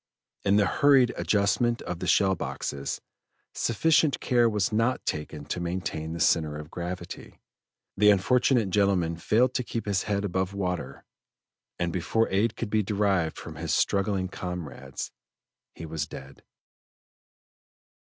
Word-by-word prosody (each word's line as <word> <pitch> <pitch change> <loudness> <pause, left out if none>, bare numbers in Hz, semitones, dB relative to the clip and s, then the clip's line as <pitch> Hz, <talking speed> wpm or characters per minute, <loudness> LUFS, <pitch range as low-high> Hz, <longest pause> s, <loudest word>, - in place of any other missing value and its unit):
In 100 0 +3
the 105 -1 +4
hurried 135 +2 +4
adjustment 105 +4 +1
of 90 -1 -5
the - - -4
shell 95 -1 +4
boxes, 70 -5 -4 0.5
sufficient 155 +4 +2
care 120 -2 +3
was 105 -3 0
not 115 +4 +1
taken 75 -1 -4
to 90 - -3
maintain 85 -2 -3
the 85 - -5
center 75 -3 +2
of 75 +2 -9
gravity, 90 0 -7 0.6
the 105 +1 +5
unfortunate 115 +2 +3
gentleman 95 -4 +2
failed 120 +9 +2
to 125 - -1
keep 115 -1 -4
his 100 -2 +1
head 100 0 0
above 95 0 -2
water, 90 -8 -3 0.7
and 85 -1 -1
before 95 +6 +1
aid 105 +3 +1
could 110 -3 -4
be 110 - +3
derived 100 -5 0
from 80 -2 -8
his 80 0 -1
struggling 100 -1 +1
comrades, 80 -8 -6 0.6
he 85 - -7
was 80 -2 -3
dead. 70 +1 -11
95 Hz, 140 wpm, -27 LUFS, 85-110 Hz, 0.7 s, the